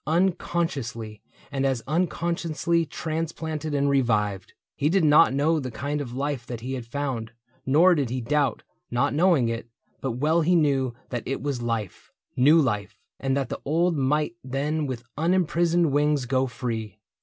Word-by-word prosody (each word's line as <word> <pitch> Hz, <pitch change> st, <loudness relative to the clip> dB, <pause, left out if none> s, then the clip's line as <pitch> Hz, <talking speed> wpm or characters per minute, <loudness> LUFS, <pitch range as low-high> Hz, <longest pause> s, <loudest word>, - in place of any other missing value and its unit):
Unconsciously, 155 Hz, -, -1 dB, 0.3 s
and 135 Hz, -1 st, -1 dB
as 130 Hz, -4 st, 0 dB
unconsciously 170 Hz, 0 st, 0 dB
Transplanted 160 Hz, -1 st, -3 dB
and 140 Hz, 0 st, +2 dB
revived. 105 Hz, -8 st, +1 dB, 0.2 s
He 145 Hz, -, +1 dB
did 190 Hz, +1 st, +3 dB
not 150 Hz, 0 st, +6 dB
know 150 Hz, +4 st, +2 dB
The 130 Hz, -3 st, -4 dB
kind 145 Hz, +5 st, -3 dB
of 125 Hz, -4 st, -6 dB
life 140 Hz, -2 st, -2 dB
that 120 Hz, -2 st, -6 dB
he 130 Hz, +3 st, -4 dB
had 125 Hz, -3 st, -5 dB
found, 120 Hz, -4 st, -3 dB, 0.3 s
nor 165 Hz, +7 st, +6 dB
did 140 Hz, -7 st, 0 dB
He 130 Hz, +2 st, -2 dB
doubt, 140 Hz, +3 st, 0 dB, 0.3 s
not 120 Hz, +2 st, +1 dB
knowing 160 Hz, -5 st, +3 dB
it; 115 Hz, 0 st, -4 dB, 0.3 s
but 130 Hz, -3 st, -2 dB
well 155 Hz, +7 st, +2 dB
he 175 Hz, +3 st, +3 dB
knew 135 Hz, -6 st, +2 dB
That 120 Hz, -2 st, -3 dB
it 135 Hz, -, -3 dB
was 140 Hz, -4 st, -2 dB
life 115 Hz, -5 st, -4 dB
— -, -, -61 dB
new 145 Hz, +6 st, +6 dB
life, 105 Hz, -7 st, -1 dB, 0.2 s
and 135 Hz, 0 st, 0 dB
that 135 Hz, -, -1 dB
the -, -, -5 dB
old 170 Hz, +4 st, +1 dB
Might 150 Hz, +3 st, +1 dB
then 145 Hz, +3 st, -1 dB
with 125 Hz, -3 st, -5 dB, 0.2 s
unimprisoned 170 Hz, -1 st, +2 dB
wings 145 Hz, -1 st, +2 dB
go 130 Hz, +1 st, +1 dB
free. 115 Hz, -5 st, -4 dB
140 Hz, 165 wpm, -25 LUFS, 125-160 Hz, 0.3 s, not